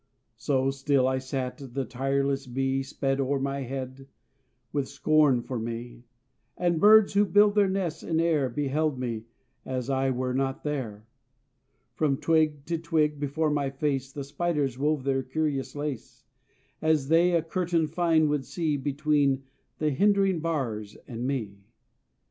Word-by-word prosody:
So 135 -1 +1
still 135 -1 +1
I 130 0 +1
sat, 130 -1 -4 0.2
the 135 -1 -1
tireless 135 +2 -1
bee 135 +2 0
Sped 135 0 -1
o'er 135 +1 0
my 140 +1 -2
head, 130 +1 -6 0.7
with 140 -2 -1
scorn 140 -3 +3
for 125 -1 -4
me, 120 +1 -6 0.5
And 175 -2 +1
birds 215 +1 +7
who 200 +1 +5
build 205 +1 +4
their 205 -2 +3
nests 180 -4 -2
in 160 -1 -1
air 155 -5 +2
Beheld 145 +2 -1
me, 115 -3 -4 0.4
as 130 0 -3
I 135 0 +1
were 125 0 -1
not 135 0 -1
there. 120 -8 -4 0.9
From 145 -3 +1
twig 155 -3 +1
to 165 0 -2
twig, 155 -3 0
before 150 +2 0
my 145 -2 0
face, 135 -1 -2
The 140 0 -5
spiders 145 -2 -1
wove 145 +1 0
their 135 0 +1
curious 140 +1 -2
lace, 145 -4 -6 0.6
As 155 -3 +1
they 170 +2 +4
a 165 -2 +2
curtain 170 -1 0
fine 160 0 +2
would 145 -2 0
see 160 -4 -1
Between 140 -1 +1 0.3
the 155 -1 0
hindering 195 +3 +3
bars 120 -11 -3
and 120 0 -4
me. 110 -8 -3
140 Hz, 150 wpm, -27 LUFS, 130-155 Hz, 0.9 s, birds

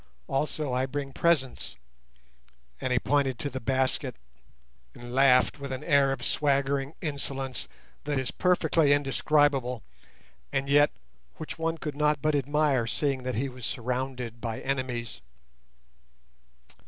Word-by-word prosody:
Also 145 0 -1
I 130 +1 +1
bring 140 0 -4
presents;" 135 - +1 1.1
and 130 - -1
he 125 - +3
pointed 135 -2 +1
to 145 - -4
the 130 - -4
basket 130 +1 0 0.8
and 120 0 -9
laughed 135 +1 +4
with 140 -1 -6
an 130 - -4
air 140 -1 +4
of 125 -3 -3
swaggering 140 0 +1
insolence 135 -3 -2 0.4
that 145 -1 0
is 130 -2 -1
perfectly 165 -5 +3
indescribable, 140 -3 +2 0.7
and 135 0 -1
yet 145 +1 +5 0.5
which 155 0 -7
one 165 0 0
could 150 -2 -5
not 150 0 +2
but 155 +2 +1
admire, 145 -3 +2
seeing 135 +1 0
that 125 0 -3
he 130 +5 0
was 125 -2 -10
surrounded 125 -1 -3
by 115 -2 -3
enemies. 125 - -3
135 Hz, 130 wpm, -28 LUFS, 130-145 Hz, 1.1 s, yet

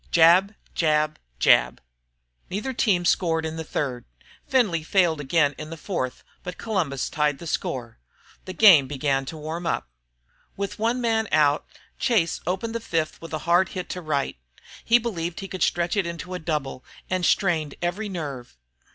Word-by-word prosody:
jab, 175 +5 +5 0.2
jab, 155 -1 +1 0.2
jab. - - +4 0.7
Neither 215 +8 -3
team 185 -7 +2
scored 165 -2 +2
in 160 0 -4
the 160 - -4
third; 130 -5 -3 0.4
Findlay 215 -11 +2
failed 165 -2 +2
again 145 0 +2
in 155 - -6
the 165 - -7
fourth, 150 -7 -4 0.2
but 180 0 -7
Columbus 170 - -1
tied 150 -2 0
the 170 - -10
score. 120 -6 -3 0.5
The 185 - -6
game 175 -12 +7
began 135 -1 0
to 155 - -6
get - - -9
warm. 165 +3 -4 0.9
With 200 +2 -4
one 235 +3 +1
man 225 -2 +1
out 145 -1 +3 0.3
Chase 220 -11 +1
opened 190 +6 -2
the 230 - -2
fifth 165 -8 -2
with 165 - -9
a 155 - -2
hard 175 +2 +4
hit 180 - -4
to 180 - -4
right. 145 - -2 0.5
He 235 - +5
believed 175 -8 -3
he 195 - -6
could 185 -2 -7
stretch 175 +4 +1
it 195 -4 +1
into 170 +2 -6
a 180 - -3
double 150 -5 -3 0.2
and 185 -1 -1
strained 165 -7 +1
every 190 +5 -2
nerve. 140 - -6
170 Hz, 170 wpm, -24 LUFS, 150-190 Hz, 0.9 s, game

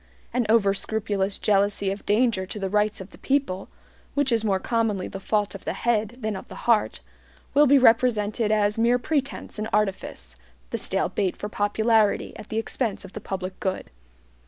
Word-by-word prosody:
An 245 -3 +1
over 210 -3 +4
scrupulous 205 -1 -1
jealousy 200 -1 +1
of 200 - -7
danger 210 -3 +2
to 210 - -6
the 195 -2 -3
rights 210 -1 +1
of 190 - -10
the - - -16
people, 265 -9 -1 0.5
which 285 -2 +2
is 225 -1 +2
more 200 -3 +2
commonly 220 -4 0
the 195 - -7
fault 205 +1 0
of 195 - -9
the - - -2
head 225 -1 0
than 215 -1 -2
of 190 - -8
the - - -10
heart, 230 -3 +2 0.5
will 295 +1 +6
be 280 +2 +6
represented 225 -3 +3
as 210 0 +2
mere 235 +2 +4
pretense 275 -3 -3
and 215 +1 -3
artifice, 195 - -2 0.4
the - - -2
stale - - 0
bait 190 -3 -1
for 210 - -5
popularity 215 +1 +1
at 210 - -11
the 220 - -3
expense 225 -1 -2
of - - -12
the 215 - -7
public 190 -1 -5
good. 190 -1 -3
210 Hz, 185 wpm, -25 LUFS, 195-230 Hz, 0.5 s, will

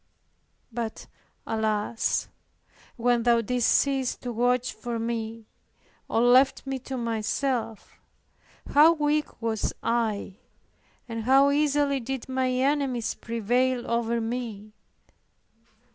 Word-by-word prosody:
But 230 -1 -5 0.4
alas! 220 0 -1 0.7
when 240 0 +2
Thou 235 0 +3
didst 245 +1 0
cease 270 -2 +2
to 245 - -6
watch 245 +2 +1
for 240 -2 -5
me, 225 -1 -4 0.6
or 225 - +2
left 255 +3 +4
me 270 -1 -3
to 260 +1 -6
myself, 230 0 -2 0.7
how 310 +3 +7
weak 300 -1 -1
was 225 -2 -1
I, 220 -4 -1 0.7
and 230 -2 -5
how 270 +2 +5
easily 285 -1 +2
did 260 +1 -5
my 260 -1 0
enemies 260 -2 0
prevail 240 +2 0
over 235 0 0
me! 225 -3 -5
240 Hz, 105 wpm, -26 LUFS, 225-265 Hz, 0.7 s, how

